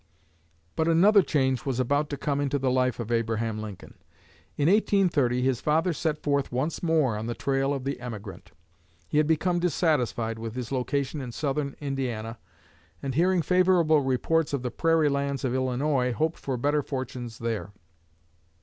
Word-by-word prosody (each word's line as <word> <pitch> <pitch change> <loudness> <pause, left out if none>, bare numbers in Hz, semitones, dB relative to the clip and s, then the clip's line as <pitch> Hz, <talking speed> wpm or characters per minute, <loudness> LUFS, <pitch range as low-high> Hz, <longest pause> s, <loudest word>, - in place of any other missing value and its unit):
But 160 - +1
another 195 +5 +6
change 130 -5 0
was 130 -3 -2
about 145 +4 +1
to 145 - -4
come 145 0 -1
into 140 0 0
the 130 -2 0
life 130 -1 +1
of 120 0 -4
Abraham 115 -1 -1
Lincoln. 105 -3 -9 0.6
In 145 - +2
1830 170 - +2
his 130 -2 +1
father 160 +4 +2
set 155 0 -1
forth 140 -2 0
once 130 +6 -2
more 155 -9 +2
on 110 +2 -4
the 120 - -3
trail 135 0 0
of 135 -2 -2
the 135 -1 -3
emigrant. 110 -5 -8 0.6
He 150 - +1
had 155 - +2
become 175 +3 +1
dissatisfied 130 - 0
with 115 0 -6
his 125 -1 -5
location 140 +2 -1
in 125 -2 -6
southern 140 +1 -2
Indiana, 120 -5 -4 0.6
and 135 - -2
hearing 175 +4 +2
favorable 180 -4 +4
reports 145 +4 0
of 135 -3 -1
the 125 - -2
prairie 165 +3 +2
lands 140 -1 -1
of 125 - 0
Illinois 130 0 0
hoped 160 +5 -1
for 130 -2 -3
better 145 +4 +1
fortunes 130 -4 -5
there. 110 -5 -3
135 Hz, 165 wpm, -27 LUFS, 125-155 Hz, 0.6 s, another